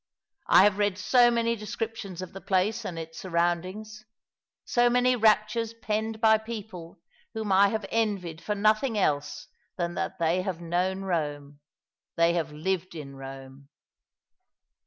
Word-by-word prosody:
I - - +7
have 205 0 +3
read 205 -2 +1
so 240 +4 +4
many 235 0 +1
descriptions 215 -4 -5
of 185 - -10
the 195 - -8
place 210 +4 0
and 175 -4 -5
its 165 0 -7
sur 185 - -8
roundings 185 +6 -2 0.3
— - - -67 0.3
so 240 0 +3
many 250 +1 +3
raptures 220 0 +2
penned 220 0 -3
by 220 -1 +5
people 210 -7 -8 0.4
whom 220 -2 -3
I 195 +1 +6
have 215 0 -2
envied 195 -7 -1
for 210 - -2
nothing 215 +3 +2
else 145 -7 -1 0.3
than 175 -1 -2
that - - -3
they 170 +2 +1
have 185 -3 -4
known 180 +3 -1
Rome; 145 -5 -3 0.6
they 170 0 +3
have 165 -3 -2
lived 175 +3 -3
in 140 -3 -8
Rome." 135 0 -10
195 Hz, 155 wpm, -27 LUFS, 170-220 Hz, 0.6 s, I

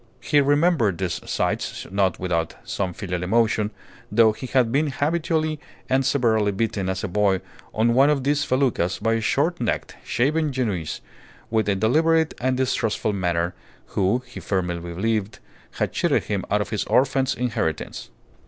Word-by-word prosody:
He 145 -1 +3
remembered 145 - +2
these 90 -2 -2
sights - - -2
not 95 -2 +1
without 85 -3 -1
some 95 -2 -2
filial 90 -1 -4
emotion, 110 +2 +2 0.4
though 110 +1 +5
he 125 +4 -7
had 125 -3 +2
been 150 +4 +2
habitually 155 +2 0 0.3
and 130 +1 +2
severely 110 -6 +2
beaten 100 -2 -1
as 95 0 -2
a - - -1
boy 100 0 +2 0.3
on 115 +2 +2
one 135 +4 +5
of 145 -3 +1
these 145 +1 +1
feluccas 125 -10 +1
by 115 - 0
a 115 - 0
short 150 +8 +1
necked, 115 - -2
shaven 150 +4 +1
Genoese, 105 - -2 0.5
with 110 -3 +1
a 100 - +2
deliberate 160 +10 +2
and 130 0 +1
distrustful 115 -4 0
manner, 90 -2 0 0.4
who 100 +7 +1
(he - - -9
firmly 90 -3 -1
believed) 100 +5 -2 0.4
had - - -2
cheated - - +1
him 100 -3 -2
out 105 +1 +2
of - - -4
his 105 - 0
orphan's 130 0 +2
inheritance. 115 -10 -3
115 Hz, 160 wpm, -23 LUFS, 95-135 Hz, 0.5 s, though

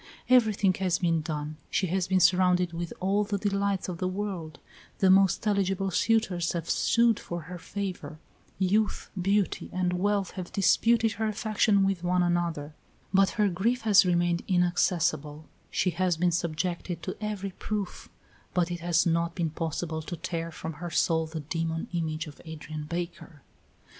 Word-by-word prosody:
Everything 215 -6 +4
has 185 -2 +1
been 165 -3 +1
done: 150 -1 -4
she 190 - +1
has 185 +1 -1
been 190 0 +3
surrounded 180 -1 +3
with 170 0 -4
all 195 +3 +1
the 205 0 -2
delights 200 -1 -1
of 175 -2 -5
the 185 - 0
world; 185 -5 -4 0.4
the 190 -1 +4
most 195 +2 +4
eligible 195 -2 +1
suitors 190 -3 +1
have 170 -2 -3
sued 235 -2 +3
for 175 0 -5
her 175 +3 -8
favor; 180 -6 -5 0.4
youth, 200 +3 0
beauty, 200 +1 0
and 180 -1 0
wealth 200 +1 0
have 185 -3 -7
disputed 225 +3 +3
her 220 0 -2
affection 215 -2 +2
with 195 -3 -1
one 180 0 +2
another, 170 -4 -1 0.4
but 195 0 +5
her 210 -1 +4
grief 210 +7 0
has 210 -3 +6
remained 175 -1 +1
inaccessible; 170 -4 +1 0.2
she 185 - +1
has 180 -1 0
been 175 +1 +2
subjected 170 +1 -2
to 185 - -4
every 205 -2 -3
proof, 200 0 -5 0.5
but 175 -1 +1
it 175 - -3
has 170 0 +2
not 170 0 +1
been 165 -4 -1
possible 160 0 -3
to 170 +2 -6
tear 165 -1 -4
from 160 0 -6
her 175 - -3
soul 160 -1 +1
the 160 0 -5
demon 165 +2 -3
image 160 -1 -2
of 150 -2 -12
Adrian 155 -1 -7
Baker. 170 -2 -6
180 Hz, 165 wpm, -28 LUFS, 165-195 Hz, 0.5 s, has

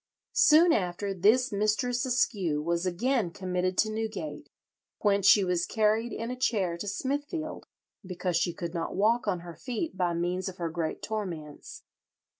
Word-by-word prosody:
Soon 325 +2 +6
after 195 0 -1
this 225 +8 +3
Mistress 215 +5 0
Askew 200 - +1
was 170 +2 0
again 225 +3 0
committed 185 0 -2
to 215 - +2
Newgate, 220 +7 -5 0.5
whence 200 -2 +3
she 205 - +7
was 180 -2 0
carried 220 +2 +1
in 230 +2 -4
a - - -3
chair 205 -9 0
to 205 - -5
Smithfield, 290 - -3 0.4
"because 180 -1 -3
she 170 +1 +1
could 170 -1 -6
not 165 -2 -3
walk 220 +4 +2
on 180 -4 0
her 170 -1 -9
feet 255 - -4
by 175 -2 0
means 180 +3 -1
of 185 - -11
her 170 -2 -3
great 160 -1 -3
torments. 170 -9 -6
200 Hz, 160 wpm, -28 LUFS, 175-230 Hz, 0.5 s, she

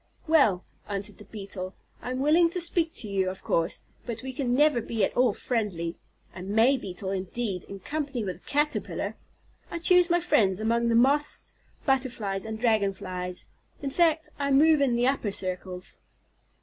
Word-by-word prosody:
"Well," 275 - +4 0.2
answered 200 0 -3
the 210 - -11
Beetle, 195 -3 -7 0.3
"I - - -5
am 255 +1 -2
willing 330 +4 +5
to 360 +2 -3
speak 335 -1 +1
to 220 - -5
you, 190 -2 0
of 190 +1 -8
course, 165 +2 0 0.2
but 235 0 -6
we 265 0 -5
can 250 -2 0
never 295 -3 +4
be 225 -2 0
at - - -5
all 250 -2 +4
friendly. 195 -8 -2 0.4
A 180 - -8
May 220 +8 +3
Beetle, 190 -5 -5
indeed, 195 0 -3
in 195 -1 -9
company 285 -4 -3
with 185 -3 -4
a - - -27
Caterpillar! 295 +1 0 0.5
I - - -4
choose 355 +1 +5
my 345 0 +3
friends 195 - +2
among 235 +2 +1
the 230 - +2
Moths, 280 +5 +2 0.3
Butterflies, 245 -8 0
and 220 0 -5
Dragon 220 -4 +2
flies, 180 -1 -5 0.4
in 275 - -2
fact, 320 0 +2
I 280 0 0
move 300 +2 +5
in 260 -4 +3
the 240 +1 +2
upper 265 -5 +1
circles." 185 -1 -5
235 Hz, 175 wpm, -27 LUFS, 195-280 Hz, 0.5 s, willing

